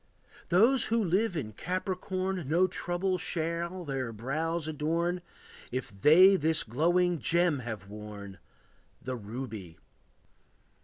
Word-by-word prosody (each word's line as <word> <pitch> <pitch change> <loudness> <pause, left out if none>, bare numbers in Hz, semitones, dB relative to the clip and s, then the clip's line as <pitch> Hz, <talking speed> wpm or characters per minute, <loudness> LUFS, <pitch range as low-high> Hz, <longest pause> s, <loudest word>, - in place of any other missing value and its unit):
Those 230 +8 +5
who 230 0 +1
live 190 +1 +1
in 110 -8 -4
Capricorn 185 - -3
No 175 +4 +4
trouble 185 0 -1
shall 170 +2 -2
their 135 -4 -3
brows 155 +8 -2
adorn 165 +4 -1 0.5
If 130 0 -3
they 160 - +7
this 160 -1 +2
glowing 175 +8 +1
gem 170 -3 +2
have 110 -5 -6
worn, 100 -2 -9 0.6
The 130 0 -4
ruby. 110 -6 -7
165 Hz, 110 wpm, -30 LUFS, 125-180 Hz, 0.6 s, they